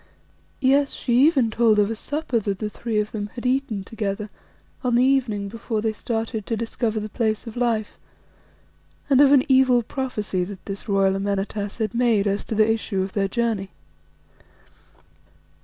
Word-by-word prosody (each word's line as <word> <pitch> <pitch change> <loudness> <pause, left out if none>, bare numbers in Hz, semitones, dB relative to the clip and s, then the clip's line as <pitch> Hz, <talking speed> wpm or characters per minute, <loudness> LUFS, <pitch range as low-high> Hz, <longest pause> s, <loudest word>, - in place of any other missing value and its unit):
Yes, 275 +2 +3
she 240 - -2
even 265 -9 +2
told 225 -1 +3
of 205 +1 +3
a - - -2
supper 290 0 -2
that 200 -2 -2
the 210 +1 -4
three 230 -1 -3
of 210 0 -2
them 205 -2 -4
had 245 - -7
eaten 250 -6 0
together 210 0 -4 0.5
on 245 -2 +1
the 245 - +4
evening 250 -7 +1
before 225 +1 -3
they 220 +1 0
started 225 -1 -3
to 225 - -1
discover 225 0 -2
the 210 - -4
Place 220 0 -1
of 230 - -8
Life, 230 -3 -1 1.1
and 270 0 +6
of 280 -1 +6
an 275 -3 +6
evil 260 -2 +4
prophecy 215 -8 -2
that 190 +1 -8
this 200 +2 -7
royal 195 -1 +3
Amenartas 200 +1 -2
had 220 -2 -2
made 235 -4 +2
as 200 0 0
to 220 - -3
the 215 0 +4
issue 220 -3 0
of 190 - -6
their 195 -1 +1
journey. 220 -2 -1
220 Hz, 175 wpm, -23 LUFS, 205-245 Hz, 1.1 s, and